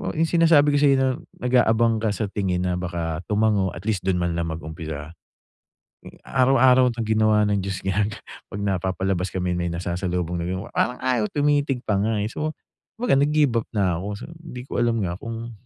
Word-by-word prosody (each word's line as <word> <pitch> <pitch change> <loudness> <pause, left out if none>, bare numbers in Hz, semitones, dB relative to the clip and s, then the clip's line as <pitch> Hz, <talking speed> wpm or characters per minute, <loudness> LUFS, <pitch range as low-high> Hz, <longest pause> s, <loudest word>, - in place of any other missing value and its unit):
'yung 160 +1 +1
sinasabi 165 -4 +5
ko - - +4
sa'yo, 140 -2 +5
na 130 0 +2 0.3
nag-aabang 115 -2 +3
ka 110 -2 0
sa 105 -3 -2
tingin 90 -3 -1
na 90 -1 0
baka 85 -3 -3
tumango 105 -3 +1
atleast 95 +2 -3
do'n 95 - +2
man 85 -1 0
lang 85 - -1
mag-umpisa. 80 -1 -6 1.1
Araw-araw 130 -1 +4
na 115 - -5
ginawa 110 -1 +3
ng 100 -1 +1
Diyos 95 -1 -4
ginag 105 +3 0 0.3
'pag 100 - -6
napapalabas 95 -1 -1
kami, 90 -1 -1
may 85 0 -1
nasasalubong 90 0 -2
na 85 - -3
'yong 95 +6 -4
parang 125 +2 0
ayaw 125 -4 +1
tumitig 145 -3 +1
pa 105 - 0
nga, 110 +1 0
eh. 110 - -2
So 155 +4 -3 0.4
kumbaga, 230 - +2
nag-give 145 -3 +2
up - - -25
na 95 -5 +1
ako, 95 - -6
sabi - - -10
ko, - - -15
hindi 125 - -7
ko - - -16
alam 120 -1 +2
nga 85 - -2
kung 115 +1 -6
105 Hz, 190 wpm, -23 LUFS, 90-125 Hz, 1.1 s, sinasabi